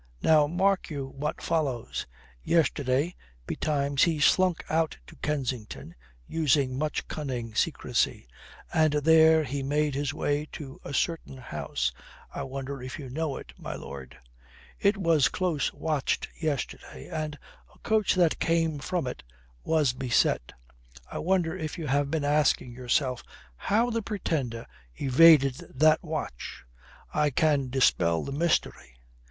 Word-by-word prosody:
Now 155 -2 +5
mark 190 +4 +1
you 140 -4 -4
what 145 +3 -4
follows. 140 -8 -1 0.3
Yesterday 145 - +1 0.3
betimes 140 -2 -1
he 165 -3 +3
slunk 180 +3 +3
out 160 0 0
to - - -14
Kensington, 130 -7 -3 0.3
using 140 -5 +1
much 150 +3 -2
cunning 125 -7 -4
secrecy. 65 - 0 0.5
And 155 -2 +3
there 160 +1 +5
he 140 0 -3
made 145 +2 0
his 140 +1 -1
way 145 +1 -1
to 135 -3 -9
a - - -7
certain 160 -2 -2
house 65 - -3 0.4
I - - -4
wonder 135 0 -5
if 125 0 -6
you 135 -4 -8
know 150 0 -2
it, - - -10
my - - -5
lord? 65 -2 -9 0.6
It 200 +1 +3
was 165 -7 +3
close 175 -6 -1
watched 155 -4 -1
yesterday, 140 - -4
and 155 -1 -4 0.3
a - - -22
coach 220 -2 +1
that 175 -3 +3
came 165 -2 +1
from 175 +2 -2
it 125 - -5 0.4
was 150 -6 +2
beset. 125 - +1 0.6
I - - -4
wonder 175 -1 +1
if 160 -2 -5
you 165 - -4
have 140 0 +1
been 155 -1 -1
asking 145 -4 +2
yourself 125 +1 0 0.3
how 225 - +1
the 230 0 -1
Pretender 150 - -3 0.3
evaded 140 -1 +6 0.2
that 155 +3 +5
watch. 155 - -5 0.5
I 150 -1 +2
can 145 -1 +2
dispel 85 -10 +2
the 140 - -5
mystery. 150 - -1
150 Hz, 135 wpm, -27 LUFS, 130-160 Hz, 0.6 s, evaded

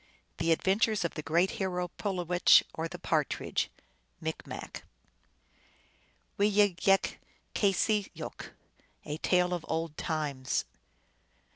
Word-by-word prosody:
The 165 0 +2
Adventures 200 +4 +2
of 170 - -2
the 155 - -4
Great 170 +5 +2
Hero 180 -2 -1
Pulowech, 180 -3 +4
or 160 +1 -3
the 175 - -8
Partridge. 155 -4 -1 0.5
(Micrnac.) - - -6 1.6
Wee 205 +1 +4
yig 205 -3 +3
yik 195 +1 +2 0.4
keseyook. 205 +1 0 0.6
A 150 0 -4
tale 180 0 +2
of 175 -2 -3
old 160 -1 -2
times. 145 -5 -1
180 Hz, 105 wpm, -30 LUFS, 160-195 Hz, 1.6 s, Pulowech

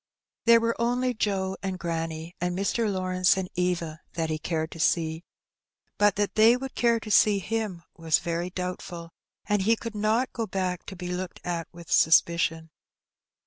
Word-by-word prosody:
There 230 0 +7
were 230 0 0
only 250 +2 +1
Joe 195 -3 -1
and 190 -1 -3
granny, 165 -1 -4
and 180 0 -1
Mr. 210 +2 0
Lawrence 185 -1 +2
and 190 -1 -2
Eva, 170 -3 -2
that 165 -2 -2
he 155 - -2
cared 160 0 -2
to 165 - -10
see, 160 0 +1 0.8
but 205 0 +4
that 205 0 0
they 225 +3 +6
would 265 +1 -6
care 235 -1 +2
to 215 -1 -7
see 210 0 +5
him 200 -3 -3
was 165 -2 +2
very 170 +1 -3
doubtful, 180 -2 -6 0.3
and 205 -1 +1
he 225 +4 +3
could 230 0 -7
not 215 +4 0
go 230 -2 -3
back 185 -2 -3
to 195 - -7
be 180 -1 -6
looked 180 0 -4
at 170 -2 -3
with 170 -1 -12
suspicion. 165 0 +3
185 Hz, 175 wpm, -27 LUFS, 170-215 Hz, 0.8 s, There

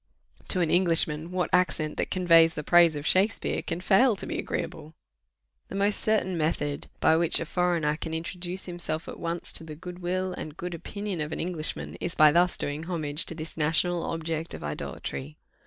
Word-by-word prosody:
To 185 - +2
an 165 - +1
Englishman, 165 -3 +4
what 180 0 -2
accent 155 -4 +1
that - - -1
conveys 165 -3 +5
the 150 - -4
praise 170 0 +5
of 145 0 -5
Shakspeare 195 +5 +2
can 165 +2 -4
fail 215 +5 +4
to - - -7
be - - -3
agreeable? 155 +2 -5 0.7
The - - -8
most 200 +1 +1
certain 215 -4 +1
method 145 -2 -1
by 160 - +4
which 165 0 +5
a 165 - -3
foreigner 170 -3 +1
an 160 - -5
introduce 175 +2 -5
himself 175 -2 -5
at - - -8
once 170 +1 -3
to - - -3
the 155 -1 -8
good 180 +3 -9
will 185 +1 -2
and 155 -3 -7
good 175 0 -5
opinion 200 +1 -5
of 150 +1 -3
an - - -4
Englishman, 165 -2 -3
is 175 - -3
by 155 -1 +7
thus 175 +3 +3
doing 145 +3 -3
homage 155 -3 -2
to 165 - -5
this 160 0 -7
national 165 +3 +1
object 165 0 -3
of - - -9
idolatry. 70 -1 -5
165 Hz, 190 wpm, -27 LUFS, 155-180 Hz, 0.7 s, by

